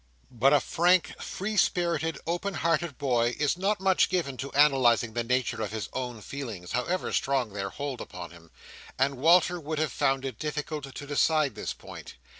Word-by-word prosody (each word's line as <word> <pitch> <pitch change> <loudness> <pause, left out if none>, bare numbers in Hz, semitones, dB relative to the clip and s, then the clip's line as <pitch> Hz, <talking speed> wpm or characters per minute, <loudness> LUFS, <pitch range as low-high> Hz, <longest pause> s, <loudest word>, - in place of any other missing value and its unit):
But 125 +3 +3
a 145 - +6
frank, 175 +3 +2
free 210 +3 -4
spirited, 170 -3 +1
open 175 +3 -2
hearted 165 -1 0
boy, 120 -4 +1
is 150 +1 +1
not 200 +3 0
much 190 -1 +3
given 170 -8 -1
to 140 +3 -5
analysing 130 -6 +4
the 120 +1 -1
nature 125 -1 0
of 105 - -2
his 110 -1 -4
own 125 -4 -4
feelings, 110 -10 -7
however 170 +10 -1
strong 130 -6 0
their 100 -1 -3
hold 140 +2 -5
upon 90 -1 -8
him: 85 -1 -16 0.5
and 135 +1 +1
Walter 175 +5 +4
would 155 0 -4
have 155 -3 0
found 135 +2 0
it 130 -5 -5
difficult 150 -2 -4
to 145 - -6
decide 145 -1 +2
this 105 - -4
point. - - -11
140 Hz, 180 wpm, -28 LUFS, 120-165 Hz, 0.5 s, a